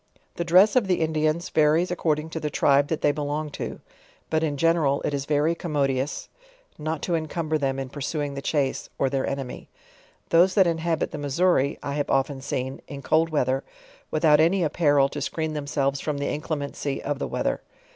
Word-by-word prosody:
The 170 - 0
dress 185 +6 +5
of 240 -6 +3
the 180 -2 +1
Indians, 155 +1 0
varies 160 +3 +3
according 160 -2 -1
to 160 - -3
the 150 - -2
tribe 140 0 +3
that 160 - -2
they 145 - +4
belong 150 +1 -3
to; - - -6 0.5
but 160 0 +2
in 145 -3 -1
general, 160 -3 +2
it - - -1
is 140 -1 -2
very 150 +2 +2
commodious, 140 -5 -1 0.5
not 155 0 -3
to 175 - -1
encumber 155 -1 -1
them 135 -1 -1
in 135 -1 -3
pursuing 145 +1 -3
the 140 - -5
chase, 140 -2 -1
or 135 - +1
their 135 -1 0
enemy; 135 -2 -5 0.6
those 180 +3 +4
that 190 - +6
inhabit 165 -1 0
the 150 - -5
Missouri, 145 0 +1
I 140 - -3
have 145 0 -2
often 135 0 0
seen, 130 0 -3
in 140 -1 -8
cold 165 +1 +2
weath 150 -5 +1
er, 135 +1 0 0.5
without 155 -1 +4
any 175 +4 +3
apparel 145 -3 +3
to 145 - -5
screen 160 +2 -2
themselves 140 -2 -1
from 150 0 -2
the 140 - -2
incle 155 +1 -3
mency 140 -1 -4
of 145 -1 -3
the - - -2
weather. - - -1
150 Hz, 195 wpm, -25 LUFS, 140-160 Hz, 0.6 s, that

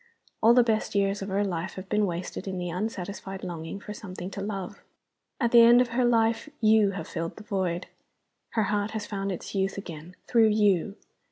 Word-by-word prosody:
All 230 +2 +6
the 250 - +7
best 220 -3 -1
years 200 0 +1
of 195 - -4
her 195 +2 +1
life 175 -2 -3
have 190 0 -8
been 210 0 +1
wasted 180 +2 -5
in 190 -1 -3
the 175 -1 -3
unsatisfied 195 0 -5
longing 170 +1 -5
for 210 - -8
something 185 -3 -7
to 200 - -5
love. 195 -3 -5 0.6
At 235 -4 +1
the 235 - +8
end 235 +1 +8
of 250 -1 +2
her 245 +2 +1
life 230 +2 +2
You 215 -2 +5
have 165 - -6
filled 165 0 -4
the 215 - -11
void. 185 -4 -2 0.7
Her 220 - +2
heart 205 0 0
has 210 - -4
found 195 -1 -3
its 180 - -6
youth 195 0 -1
again, 170 -2 -8
through 230 -2 +4
You. 205 -2 +2
200 Hz, 200 wpm, -27 LUFS, 185-220 Hz, 0.7 s, the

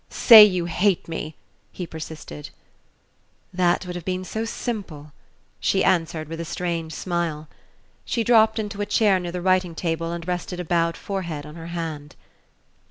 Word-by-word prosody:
"Say 225 -3 +9
you 185 -4 +2
hate 180 +3 +1
me!" 160 -2 -5 0.4
he 180 - -6
persisted. 155 - -8 1.0
"That 180 0 +1
would 180 0 -6
have 175 - -6
been 185 +1 -3
so 220 +4 -3
simple," 190 - -5 0.5
she - - +1
answered 165 -3 0
with 165 +1 -7
a - - -3
strange 165 -1 -3
smile. 165 -4 -3 0.6
She 235 - -1
dropped 220 -1 +4
into 205 -2 -4
a 205 - -2
chair 205 -4 +3
near 175 -1 -5
the 180 0 -4
writing 185 -2 +2
table 165 0 -2
and 170 0 -6
rested 180 0 -3
a 180 - -4
bowed 170 0 +1
forehead 170 -7 -5
on 150 - -10
her 165 0 -9
hand. 160 -4 -6
175 Hz, 165 wpm, -23 LUFS, 165-190 Hz, 1.0 s, Say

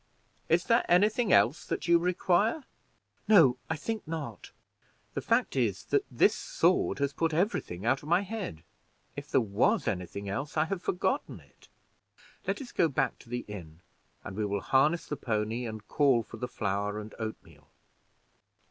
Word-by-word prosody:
Is 170 +2 +3
there 230 +3 +3
any 180 +4 +6
thing 225 -2 -1
else 150 -1 +4
that - - -3
you 170 0 +6
require?" 180 - +1 0.6
"No, 165 - +6
I 160 - 0
think 220 +6 -4
not; 160 -3 -6 0.6
the - - -3
fact - - +1
is, - - 0
that 420 -1 +2
this - - +4
sword - - +1
has 140 0 -1
put 165 0 0
every 195 +7 +1
thing 90 +4 -8
out 130 +3 +2
of 150 - -10
my 175 +3 +4
head. 195 - -6 0.5
If - - -7
there - - +4
was 115 - +1
anything 95 +1 -3
else, 135 +11 -4
I 155 - +3
have 180 +2 -3
forgotten 195 +11 -1
it. - - -22 0.8
Let 285 - -1
us 250 - -11
go 165 - +3
back 140 - -1
to - - -17
the 120 0 -4
inn, 85 -5 -9 0.4
and 95 - -7
we 105 - -1
will 100 -1 -1
harness 150 +6 +2
the 150 - -4
pony, 115 +1 -2
and 110 -1 -8
call 135 -6 +3
for 115 - -11
the 125 - -3
flour 105 -2 -2
and 105 0 -9
oatmeal." 110 -1 -7
145 Hz, 175 wpm, -29 LUFS, 110-180 Hz, 0.8 s, any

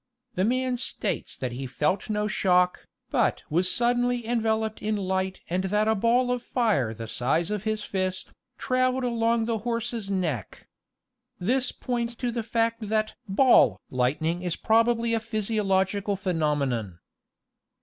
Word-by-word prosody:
The 185 - 0
man 255 +3 +1
states 240 - -3
that 130 -2 -3
he 130 +2 -5
felt 150 - -1
no 210 0 0
shock, 180 -2 +2 0.2
but - - +1
was 180 +4 +3
suddenly 245 0 +1
enveloped 220 -2 0
in 215 0 0
light 190 -1 -2
and 185 +2 -1
that 210 +3 +1
a 220 - +4
ball 235 +4 +2
of 250 -1 -1
fire 215 - +1
the 115 +1 -7
size 155 - 0
of 210 0 -3
his 215 -1 -1
fist, 185 -1 -3 0.3
traveled 255 0 +1
along 230 -1 +1
the 225 -1 -1
horse's 230 -2 -3
neck. 170 - -3 0.7
This 250 +7 0
points 240 -1 -3
to 240 +1 -2
the 235 0 -2
fact 230 -1 -1
that 215 0 0 0.2
"ball" 195 - +5
lightning 150 +7 0
is 180 -2 -2
probably 230 +1 +2
a 225 - +2
physiological 205 -3 0
phe 190 -1 -2
nomenon. 140 - -1
215 Hz, 150 wpm, -26 LUFS, 180-235 Hz, 0.7 s, ball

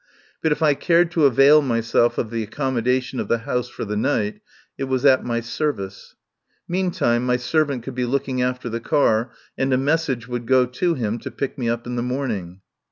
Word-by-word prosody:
But 160 - +1
if 150 - 0
I 150 -2 +5
cared 170 +3 +2
to 160 -4 +4
avail 140 +4 +6
myself 115 -2 +1
of 110 - -2
the 115 -1 -2
accommodation 125 +2 -1
of - - -3
the 115 - +2
house 125 0 -1
for - - -6
the 105 0 -3
night 105 0 -1 0.3
it 135 - -3
was 130 +1 -1
at 130 -2 +5
my 115 -1 -1
service. 115 -6 -4 0.5
Meantime 175 -10 0
my 125 0 +2
servant 140 -1 0
could 135 - -6
be 125 0 -1
looking 130 0 -1
after 125 0 -2
the 115 0 -3
car, 115 -2 +2 0.3
and 135 0 +1
a 130 - +3
message 135 -3 0
would 120 -1 -5
go 130 0 +4
to 165 +8 -1
him 115 -2 -2
to - - -6
pick 140 - -4
me 125 -4 -2
up 115 0 -2
in 125 0 -4
the - - 0
morning. 115 -8 -3
125 Hz, 205 wpm, -22 LUFS, 115-140 Hz, 0.5 s, avail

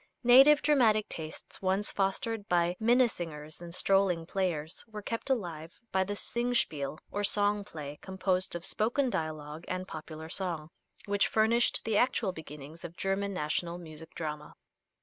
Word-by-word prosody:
Native 270 +5 +7
dramatic 230 -8 +4
tastes, 160 -1 -6
once 195 +2 0
fostered 205 +2 -1
by 175 0 +2
minnesingers 175 -11 0
and 170 -1 -8
strolling 190 -3 +2
players, 170 -3 -2
were 215 -2 -8
kept 230 +5 -4
alive 170 -10 -3
by 190 0 +2
the 205 +2 -4
"singspiel," 220 - 0
or 205 - -2
song 205 0 +2
play, 150 -6 -8
composed 185 -1 0
of 170 - -3
spoken 240 +4 +2
dialogue 155 -1 -4
and 185 0 -3
popular 155 -1 -8
song, 165 -3 -4 0.3
which 205 0 +2
furnished 225 +2 +3
the 220 -2 +1
actual 230 -5 +2
beginnings 155 -1 -10
of 170 0 -8
German 195 +1 -1
national 170 0 -2
music 160 -1 -11
drama. 150 -2 -5
185 Hz, 145 wpm, -30 LUFS, 160-210 Hz, 0.3 s, Native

